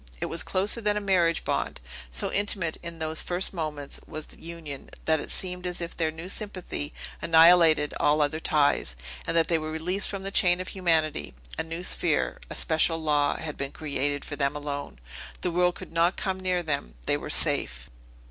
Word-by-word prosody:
It -, -, -1 dB
was 165 Hz, -, -1 dB
closer 200 Hz, +5 st, +1 dB
than 210 Hz, -1 st, +1 dB
a -, -, +2 dB
marriage 180 Hz, -5 st, +2 dB
bond. -, -, -1 dB, 0.3 s
So -, -, -1 dB
intimate, 195 Hz, -5 st, 0 dB
in 170 Hz, -1 st, -6 dB
those 160 Hz, 0 st, -1 dB
first 180 Hz, +2 st, -1 dB
moments, 150 Hz, -5 st, -4 dB
was 155 Hz, 0 st, -5 dB
the -, -, -13 dB
union, 160 Hz, -5 st, -8 dB, 0.2 s
that 160 Hz, -1 st, +3 dB
it -, -, -7 dB
seemed 180 Hz, -1 st, -2 dB
as 180 Hz, -, -4 dB
if 170 Hz, -1 st, -5 dB
their 160 Hz, -2 st, +1 dB
new 160 Hz, +3 st, -7 dB
sympathy 185 Hz, -7 st, -4 dB, 0.3 s
annihilated 165 Hz, -2 st, +6 dB
all 150 Hz, +1 st, +3 dB
other 150 Hz, +1 st, +1 dB
ties, 145 Hz, -, +2 dB, 0.3 s
and 165 Hz, -, +1 dB
that 165 Hz, -, +4 dB
they 165 Hz, -2 st, +2 dB
were 155 Hz, 0 st, -4 dB
released 175 Hz, +5 st, 0 dB
from 195 Hz, -1 st, -4 dB
the 195 Hz, -, -4 dB
chain 175 Hz, -2 st, +4 dB
of 185 Hz, -, -5 dB
humanity; 160 Hz, -, +1 dB, 0.2 s
a -, -, -1 dB
new 165 Hz, +2 st, -5 dB
sphere, 170 Hz, -3 st, +1 dB
a -, -, -6 dB
special 165 Hz, +1 st, +2 dB
law, 150 Hz, -2 st, +2 dB
had 155 Hz, -2 st, -5 dB
been 140 Hz, 0 st, -4 dB
created 145 Hz, -1 st, -2 dB
for 145 Hz, -, -5 dB
them 140 Hz, 0 st, 0 dB
alone. 145 Hz, -1 st, -5 dB, 0.4 s
The 180 Hz, -, 0 dB
world 180 Hz, +1 st, +2 dB
could -, -, -9 dB
not 170 Hz, +2 st, +3 dB
come 190 Hz, -2 st, -1 dB
near 180 Hz, -1 st, 0 dB
them; 140 Hz, -, -2 dB
they -, -, +3 dB
were -, -, -5 dB
safe! 60 Hz, 0 st, +2 dB
165 Hz, 195 wpm, -27 LUFS, 150-180 Hz, 0.4 s, annihilated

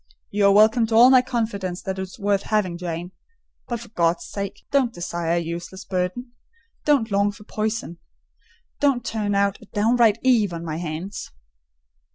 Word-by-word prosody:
"You 205 Hz, 0 st, +3 dB
are -, -, +6 dB
welcome 220 Hz, +3 st, +5 dB
to 220 Hz, -, -1 dB
all 245 Hz, +3 st, +8 dB
my 255 Hz, -1 st, +7 dB
confidence 205 Hz, -7 st, -3 dB
that 190 Hz, 0 st, -4 dB
is 190 Hz, -1 st, -6 dB
worth 200 Hz, -2 st, +1 dB
having, 205 Hz, -5 st, 0 dB
Jane; 175 Hz, 0 st, -5 dB, 0.6 s
but 235 Hz, -2 st, -3 dB
for 235 Hz, -, -11 dB
God's 170 Hz, -4 st, 0 dB
sake, 200 Hz, -1 st, -6 dB
don't 270 Hz, -4 st, +2 dB
desire 175 Hz, -3 st, -3 dB
a -, -, +2 dB
useless 170 Hz, +2 st, -5 dB
burden! 185 Hz, +7 st, -3 dB, 0.5 s
Don't 270 Hz, -7 st, +2 dB
long 200 Hz, +1 st, +2 dB
for 205 Hz, -, -14 dB
poison—don't 225 Hz, -, -4 dB
turn 210 Hz, -2 st, -1 dB
out 200 Hz, 0 st, +1 dB
a -, -, -13 dB
downright 225 Hz, +1 st, +3 dB
Eve 225 Hz, -8 st, +3 dB
on 170 Hz, 0 st, -6 dB
my 155 Hz, -1 st, -3 dB
hands!" 175 Hz, +4 st, -5 dB
200 Hz, 165 wpm, -23 LUFS, 180-225 Hz, 0.6 s, all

